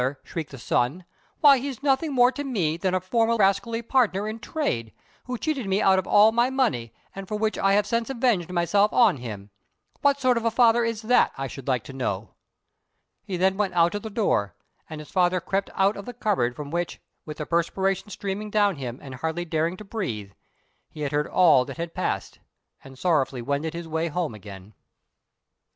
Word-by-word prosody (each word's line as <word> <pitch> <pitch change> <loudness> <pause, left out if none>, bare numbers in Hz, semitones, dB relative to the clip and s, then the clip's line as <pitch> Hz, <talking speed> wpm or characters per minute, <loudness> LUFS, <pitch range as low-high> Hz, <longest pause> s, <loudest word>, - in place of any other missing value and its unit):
shrieked 160 -3 -5
the 135 - -10
son; 130 +8 -1 0.4
"why 280 -3 +7
he's 270 0 -6
nothing 285 +2 +1
more 250 -1 +5
to 285 +3 -5
me 190 - -1
than 185 +2 -1
a - - +2
former 225 +5 +1
rascally 215 +3 +1
partner 215 -5 +1
in 220 +1 -5
trade, 170 - -2 0.3
who 250 0 -4
cheated 275 -5 -2
me 195 +1 +1
out 190 -2 +4
of 190 - -5
all 210 +2 +6
my 235 +2 +2
money, 230 - 0 0.2
and 195 -1 -8
for 210 - -3
which 215 0 0
I 195 0 +2
have 205 0 +3
since 230 +2 -1
avenged 235 -9 0
myself 200 +4 +2
on 235 - +4
him. 105 -5 -8 0.5
What 280 0 +3
sort 255 -3 +3
of 230 - -2
a - - +4
father 235 0 +4
is 230 -1 -2
that, 245 +3 +3
I 135 - -3
should 135 +1 -9
like 125 -5 0
to 135 - -10
know?" 105 -6 -3 0.9
He 195 -3 -4
then 190 +2 +2
went 200 -3 -1
out 170 0 +4
of 205 - -3
the 220 - -6
door; 105 - 0 0.3
and 155 - -7
his 150 - -11
father 185 -1 +2
crept 195 +3 -2
out 195 +2 +2
of 200 - -8
the 245 - -8
cupboard 185 - 0
from 145 -1 -7
which, 175 +1 -3 0.2
with 150 -1 -8
the 150 - -4
perspiration 190 +4 0
streaming 200 +1 -4
down 205 -4 +2
him 125 -3 -5
and 135 -2 -8
hardly 160 +6 -3
daring 165 +2 -1
to 215 - -9
breathe, 115 - -4 0.6
he 155 - -10
had 145 -2 -2
heard 150 0 0
all 165 -8 +5
that - - -8
had 170 0 -5
passed, - - -3 0.4
and 135 -1 -13
sorrowfully 135 -5 0
wended 145 +5 -2
his 170 -1 -6
way 160 +1 -1
home 165 -4 -2
again. 100 -1 -11
190 Hz, 205 wpm, -25 LUFS, 150-225 Hz, 0.9 s, why